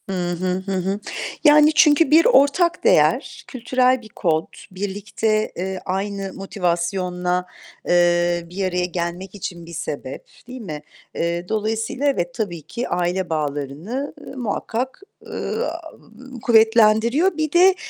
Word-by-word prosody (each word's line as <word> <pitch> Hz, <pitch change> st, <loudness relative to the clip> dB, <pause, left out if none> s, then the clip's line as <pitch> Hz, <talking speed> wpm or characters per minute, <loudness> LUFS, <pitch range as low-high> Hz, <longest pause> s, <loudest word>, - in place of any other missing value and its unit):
Hı 180 Hz, -2 st, -1 dB
hı, 175 Hz, +1 st, -3 dB, 0.2 s
hı 195 Hz, -, -4 dB
hı. 190 Hz, +2 st, -1 dB, 0.4 s
Yani, 300 Hz, 0 st, +6 dB
çünkü 305 Hz, 0 st, +5 dB
bir 325 Hz, +2 st, +6 dB
ortak 340 Hz, -, +3 dB
değer, -, -, +2 dB
kültürel 255 Hz, 0 st, +1 dB
bir 220 Hz, -, -14 dB
kod, 165 Hz, -5 st, 0 dB, 0.3 s
birlikte, 205 Hz, +3 st, -2 dB
eee, 190 Hz, +1 st, -4 dB
aynı 195 Hz, +1 st, -3 dB
motivasyonla, 180 Hz, -1 st, -1 dB, 0.4 s
eee, 175 Hz, 0 st, +3 dB
bir 190 Hz, +2 st, -3 dB
araya 180 Hz, -1 st, 0 dB
gelmek 180 Hz, +2 st, -4 dB
için 175 Hz, -3 st, -6 dB
bir 170 Hz, -, -11 dB
sebep, 145 Hz, -5 st, -6 dB, 0.2 s
değil 255 Hz, 0 st, -8 dB
mi? 155 Hz, -8 st, -6 dB, 0.3 s
Eee, 170 Hz, +1 st, -2 dB
dolayısıyla 220 Hz, +5 st, -2 dB
evet 175 Hz, -12 st, 0 dB
tabii 175 Hz, -6 st, -4 dB
ki 235 Hz, -, -5 dB
aile 180 Hz, +1 st, -1 dB
bağlarını, 155 Hz, -, -3 dB
ııı, 275 Hz, -, -10 dB
muhakkak, 245 Hz, -, -3 dB, 0.3 s
ııı, -, -, -3 dB, 0.7 s
kuvvetlendiriyor. 230 Hz, -, +4 dB
Bir 310 Hz, -1 st, -1 dB
de 365 Hz, +3 st, +6 dB
195 Hz, 125 wpm, -21 LUFS, 175-245 Hz, 0.7 s, Yani